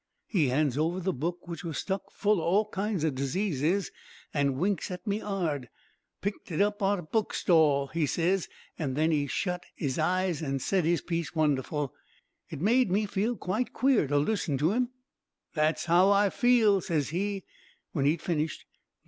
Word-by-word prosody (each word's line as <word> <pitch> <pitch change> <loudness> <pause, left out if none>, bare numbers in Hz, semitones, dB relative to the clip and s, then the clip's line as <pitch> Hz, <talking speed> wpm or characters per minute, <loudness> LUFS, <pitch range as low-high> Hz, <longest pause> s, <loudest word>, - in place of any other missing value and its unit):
"He 165 - +1
hands 140 0 +1
over 165 +4 0
the 185 +1 -1
book, 170 +6 -4
which 170 -1 -6
was 165 -3 -4
stuck 195 0 -3
full 205 -3 +1
o' - - -4
all 200 +5 +2
kinds 195 -4 -1
o' 155 - +2
diseases, 160 +5 0 0.4
and 140 -3 +1
winks 190 +4 0
at 180 +2 -7
me 210 0 -1
'ard. 165 -10 -2 0.5
"'Picked 200 -1 -4
it 160 - -2
up 205 +1 +1
on 200 +1 +2
a 175 - -6
book 215 +7 -1
stall,' 155 -6 +4
he 165 -2 0
ses; 175 +5 0 0.3
then 155 +2 +1
he 145 -2 +1
shut 180 +5 -2
'is 140 -3 -2
eyes 180 0 +1
an' 135 -3 -1
said 180 +6 0
his 170 +1 +2
piece 170 -2 -3
wonderful. 150 -2 0 0.6
It - - -7
made 240 +4 +3
me 205 +4 +2 0.3
quite 215 +7 -2
queer 260 - +3
to 145 +1 +1
listen 150 -2 0
to 155 +8 +2
'im. 245 +1 +1 0.6
That's 155 0 +1
how 175 +3 +5
I 200 0 +4
feel,' 225 -6 +4
ses 155 -6 -1
he, 195 +3 -2 0.5
when 140 -4 0
he'd 155 +4 +1
finished. 155 -3 -2
170 Hz, 175 wpm, -29 LUFS, 150-200 Hz, 0.6 s, how